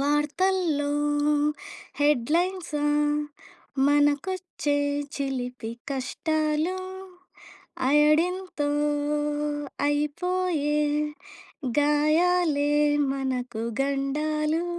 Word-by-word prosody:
వార్తల్లో 295 Hz, +1 st, +1 dB, 1.1 s
హెడ్‌లైన్సా 300 Hz, +3 st, +1 dB, 1.0 s
మనకొచ్చే 290 Hz, +1 st, +1 dB, 0.4 s
చిలిపి 250 Hz, -4 st, -3 dB, 0.2 s
కష్టాలు. 310 Hz, +5 st, -1 dB, 1.1 s
అయోడిన్‌తో 305 Hz, +2 st, +2 dB, 1.2 s
అయిపోయే 300 Hz, +1 st, 0 dB, 1.0 s
గాయాలే 300 Hz, +1 st, +3 dB, 0.4 s
మనకు 250 Hz, -4 st, -3 dB, 0.2 s
గండాలు. 300 Hz, +4 st, 0 dB
295 Hz, 40 wpm, -26 LUFS, 285-335 Hz, 1.2 s, గాయాలే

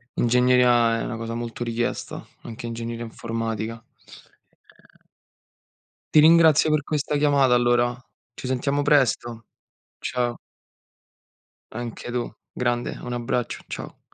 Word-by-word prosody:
ingegneria 120 Hz, -1 st, +4 dB
è -, -, -3 dB
una 115 Hz, -2 st, -4 dB
cosa 115 Hz, 0 st, -4 dB
molto 120 Hz, 0 st, -5 dB
richiesta, 120 Hz, 0 st, -3 dB, 0.2 s
anche 115 Hz, +2 st, -9 dB
ingegneria 115 Hz, 0 st, -5 dB
informatica. 115 Hz, 0 st, -4 dB
Ehm -, -, -22 dB, 1.1 s
Ti 155 Hz, -, +9 dB
ringrazio 160 Hz, -1 st, +6 dB
per 150 Hz, -2 st, +2 dB
questa 150 Hz, -1 st, -1 dB
chiamata 140 Hz, -3 st, +3 dB
allora. 120 Hz, 0 st, +3 dB, 0.4 s
Ci 130 Hz, -, -8 dB
sentiamo 140 Hz, +2 st, 0 dB
presto! 125 Hz, -5 st, +1 dB, 0.5 s
Ciao. 120 Hz, -1 st, -2 dB, 1.3 s
Anche 120 Hz, +1 st, -6 dB
tu. 120 Hz, -1 st, -3 dB, 0.2 s
Grande, 120 Hz, -1 st, -1 dB
un 125 Hz, -, -5 dB
abbraccio. 120 Hz, 0 st, -2 dB
Ciao. -, -, -7 dB
120 Hz, 110 wpm, -24 LUFS, 115-130 Hz, 1.3 s, Ti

